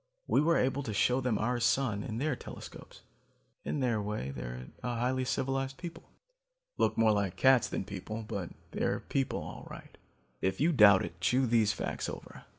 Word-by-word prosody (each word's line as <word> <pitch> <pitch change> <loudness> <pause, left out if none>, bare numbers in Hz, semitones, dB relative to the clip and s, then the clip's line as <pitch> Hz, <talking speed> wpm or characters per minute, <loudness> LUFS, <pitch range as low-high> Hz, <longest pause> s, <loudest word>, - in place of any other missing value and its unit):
We - - +3
were 165 +2 +3
able 135 +2 +1
to 110 -6 -4
show 125 +5 +3
them 125 -4 +1
our 120 +3 0
sun, 120 -4 +2
in 110 +1 -4
their 145 +2 0
telescopes. - - -11 0.6
In 145 - -2
their 120 -4 +1
way, 100 -10 -3
they're 60 -1 -7
a 125 -1 -2
highly 130 +2 0
civilized 135 +1 -1
people. 170 -2 -9 0.7
Look - - +2
more 115 -1 +5
like 100 -3 0
cats 130 -3 +5
than - - -2
people, 105 +3 -6
but 95 -5 -4 0.2
they're - - 0
people 135 -1 -1
all - - -9
right. - - -11 0.5
If 95 0 0
you 160 +5 +4
doubt 105 - +7
it, 85 +1 -10
chew 130 +9 +3
these 110 -3 +3
facts - - -3
over. - - -9
120 Hz, 180 wpm, -31 LUFS, 100-135 Hz, 0.7 s, doubt